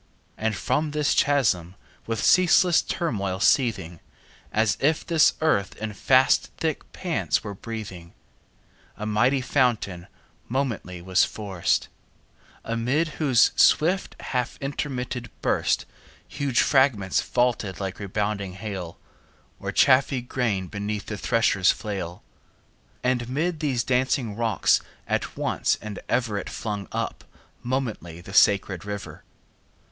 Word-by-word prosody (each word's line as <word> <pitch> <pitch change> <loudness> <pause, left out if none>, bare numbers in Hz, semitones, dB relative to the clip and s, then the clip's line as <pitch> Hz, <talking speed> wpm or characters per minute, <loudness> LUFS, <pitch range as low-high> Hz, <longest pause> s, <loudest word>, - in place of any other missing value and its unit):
And 110 -1 -1
from 150 +9 0
this 150 -1 +2
chasm, 105 - +2 0.3
with 115 -2 -2
ceaseless 180 -1 +5
turmoil 100 - -2
seething, 100 - +1 0.5
As 110 -1 +2
if 155 +3 +1
this 165 -3 +4
earth 100 -12 +1
in 110 -1 -5
fast 130 +6 +3
thick 160 -3 -3
pants 175 - -1
were 105 -2 -5
breathing, 95 -5 -8 0.8
A 105 - -5
mighty 120 +6 +2
fountain 120 -10 0 0.4
momently 115 -9 -3
was 95 0 +3
forced; 95 -5 -1 0.8
Amid 125 +8 0
whose 135 -7 +4
swift 180 +5 +3
half 125 -2 -2
intermitted 125 -4 -4
burst - - +1 0.5
20 - - -14
Huge 140 -4 +1
fragments 125 -9 +3
vaulted 115 -7 0
like 95 -1 -4
rebounding 100 -1 -2
hail, 95 -4 -6 0.6
Or - - -4
chaffy 130 0 +4
grain 115 -7 -1
beneath 105 +2 -4
the 105 - -5
thresher's 115 -6 +2
flail: 95 -5 -5 0.8
And 125 -1 0
'mid 160 +5 -1
these 135 -6 0
dancing 125 -3 0
rocks 115 -1 +2 0.3
at - - -2
once - - 0
and 105 -2 -7
ever 115 -5 0
It - - -7
flung 105 -4 -4
up - - -3 0.4
momently 115 -10 -3
the 95 +3 -11
sacred 100 -3 +3
river. 100 0 -7
115 Hz, 120 wpm, -25 LUFS, 100-135 Hz, 0.8 s, ceaseless